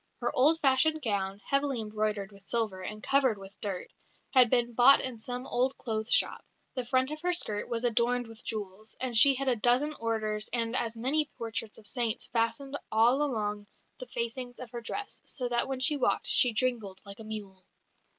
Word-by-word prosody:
Her - - -2
old 305 +6 +4
fashioned 290 +3 +3
gown, 200 -3 -2
heavily 275 -2 +1
embroidered 210 -2 -2
with 200 -1 -18
silver, 215 -5 -1
and 215 +3 -7
covered 265 -5 +3
with 195 0 -13
dirt, 195 -3 -5 0.4
had 255 -3 +6
been 240 -1 +1
bought 250 +4 +7
in 250 -3 -4
some 250 +3 -4
old 255 +2 0
clothes 220 -1 -3
shop. - - +3 0.3
The 255 -3 -4
front 260 +2 +1
of 305 0 -6
her 360 +1 +1
skirt 210 -12 +1
was 235 0 -2
adorned 245 +1 +1
with 225 0 -14
jewels, 210 -1 -6
and 255 -2 -3
she 275 +4 +7
had 270 +1 -3
a 255 - +3
dozen 245 +7 +2
orders 215 -4 -1
and 230 0 -1
as 230 -3 -1
many 290 +6 +1
portraits 225 -2 -5
of 220 - -16
saints 235 0 -1
fastened 270 +5 -1
all 235 +5 +4
along 210 -7 -2 0.3
the 255 - -7
facings 245 +1 -4
of 250 -3 -8
her 240 - -6
dress, 405 - -5
so 250 -2 -1
that 240 0 +1
when 265 -1 -3
she 290 +3 +3
walked 270 - +1
she 245 - +5
jingled 220 -5 0
like 200 +1 -10
a - - -8
mule." 205 -3 -8
235 Hz, 195 wpm, -30 LUFS, 215-260 Hz, 0.4 s, bought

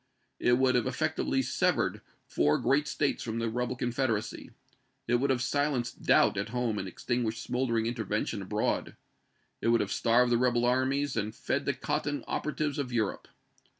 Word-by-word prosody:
It 120 0 +3
would 130 0 +3
have 125 0 +2
effectually 135 -1 0
severed - - 0 0.2
four 75 +1 +2
great 145 +2 +2
States 145 -1 0
from 115 -1 -3
the 115 -1 -1
rebel 125 +1 -2
Confederacy; 120 -3 -2 0.6
it 120 - +3
would 140 +3 0
have 130 -2 +1
silenced 140 -2 -1
doubt - - +4
at 100 +2 -2
home 120 -3 -1
and 95 - -4
extinguished 115 +3 -2
smoldering 120 -3 0
intervention 115 -3 -2
abroad; - - -1 0.7
it - - -1
would 115 0 +4
have - - -2
starved 120 +1 +3
the 120 - +3
rebel 120 -1 +2
armies 130 +3 +1
and 105 +1 -2
fed - - -2
the - - 0
cotton 145 0 -2
operatives 150 -1 -2
of 130 -3 -3
Europe. 110 -4 -1
125 Hz, 165 wpm, -29 LUFS, 115-135 Hz, 0.7 s, doubt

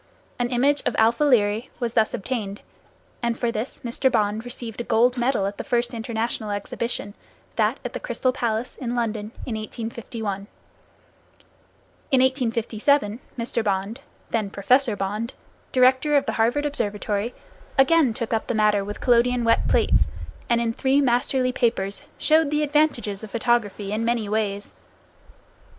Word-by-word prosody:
An 240 0 0
image 275 +4 +2
of - - +1
[Greek: - - -2
alpha] 230 +5 +4
Lyræ 225 -5 +3
was 235 -2 -2
thus 220 -1 +2
obtained, 205 -3 -4 0.6
and 235 -1 0
for 240 -2 0
this 225 +3 -4
Mr. 250 +3 +1
Bond 215 -1 +1
received 240 -2 -6
a - - -3
gold 245 +2 +3
medal 245 -4 +1
at 200 +1 -4
the - - -2
first 240 0 0
international 225 -1 -3
exhibition, 205 +1 -3 0.4
that - - +1
at - - -4
the - - -4
Crystal 255 - 0
Palace, 235 -2 -2
in 245 -2 -3
London, 220 -3 -2 0.2
in 245 - -3
1851. 220 -2 -5 1.6
In 265 -4 +4
1857, 240 -2 +1 0.2
Mr. 230 -1 -1
Bond, 200 +4 -1 0.3
then 215 -3 0
Professor 235 +4 +2
Bond, 210 +5 -3 0.4
director 260 +3 +4
of 280 - +1
the - - -1
Harvard 240 +6 +1
Observatory, 210 -4 -2 0.4
again 275 0 +5
took 230 0 -4
up 220 - -1
the - - -1
matter 210 -2 +3
with 205 +1 -7
collodion 245 0 +3
wet 230 0 +3
plates, - - +3 0.4
and 235 -1 +3
in 230 -1 0
three 265 +4 +2
masterly 255 0 +2
papers 225 -6 0 0.2
showed 315 -1 +3
the 300 +1 +1
advantages 280 -9 +1
of 220 - -7
photography 220 -4 0
in 215 +2 -1
many 230 -2 0
ways. 205 -1 -2
235 Hz, 155 wpm, -24 LUFS, 215-255 Hz, 1.6 s, again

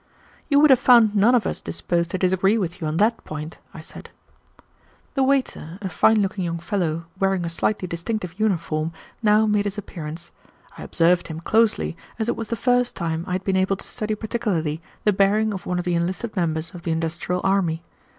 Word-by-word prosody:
"You 285 -2 +4
would 300 -1 +6
have 260 - +6
found 235 -5 +6
none 220 +5 +5
of 235 - +2
us - - -3
disposed 170 -1 -2
to 185 - -2
disagree 190 +3 +2
with 180 -3 -3
you 160 - -1
on 155 +1 -2
that 220 +4 +2
point," 155 +1 -7
I 160 - -10
said. - - -11 1.0
The 270 - 0
waiter, 260 - 0
a 195 -3 -4
fine 220 +2 +4
looking 190 0 -2
young 170 -1 -2
fellow, 170 -2 -2
wearing 195 -2 +1
a - - -2
slightly 185 +3 -1
distinctive 180 +2 -4
uniform, 165 -6 0 0.3
now 215 0 +4
made 210 -1 +1
his 205 0 -3
appearance. 170 -3 -7 0.4
I - - -10
observed 175 +1 +2
him 160 -1 -6
closely, 220 -2 +2 0.2
as 220 -1 -2
it 240 - 0
was 225 - -5
the 230 - 0
first 245 +2 +1
time 165 0 -2
I 180 - -2
had 185 +1 -2
been 195 -1 0
able 190 +1 +2
to - - -11
study 215 0 -3
particularly 205 -9 -2 0.2
the 210 - +3
bearing 205 +3 +2
of 190 - -7
one 180 - -1
of 180 - -2
the 175 - 0
enlisted 185 +7 -2
members 165 -2 -1
of 175 - -9
the 170 - -4
industrial 165 +2 -1
army. 175 -4 +1
190 Hz, 205 wpm, -23 LUFS, 170-215 Hz, 1.0 s, would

